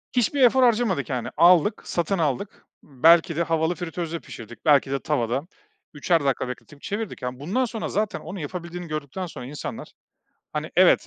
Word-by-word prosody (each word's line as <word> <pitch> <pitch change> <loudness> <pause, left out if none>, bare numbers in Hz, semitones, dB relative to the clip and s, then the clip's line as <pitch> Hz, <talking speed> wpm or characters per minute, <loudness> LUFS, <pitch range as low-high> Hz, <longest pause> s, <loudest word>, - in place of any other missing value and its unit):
Hiçbir 250 +3 +2
efor 255 +1 +6
harcamadık, 220 - +2
yani, 125 -3 -2
aldık, 175 +4 +5
satın 175 +3 -1
aldık, 160 +4 -2 0.2
belki 165 +4 +4
de 170 - +1
havalı 165 +1 0
fritözde 170 -1 -4
pişirdik, 115 -5 -11
belki 140 -3 +4
de 140 - 0
tavada 135 +1 -1 0.5
üçer 155 +1 +1
dakika 135 -2 0
bekletip 140 +3 -9
çevirdik. 215 0 -4
Ya, 125 0 -4
bundan 200 - 0
sonra 225 -2 -4
zaten 210 0 -1
onu 190 - -8
yapabildiğini 170 +2 -6
gördükten 155 +4 -4
sonra 150 -7 -8
insanlar, 145 +3 -7 0.6
hani, - - -3
evet, - - +5
165 Hz, 165 wpm, -24 LUFS, 140-190 Hz, 0.6 s, efor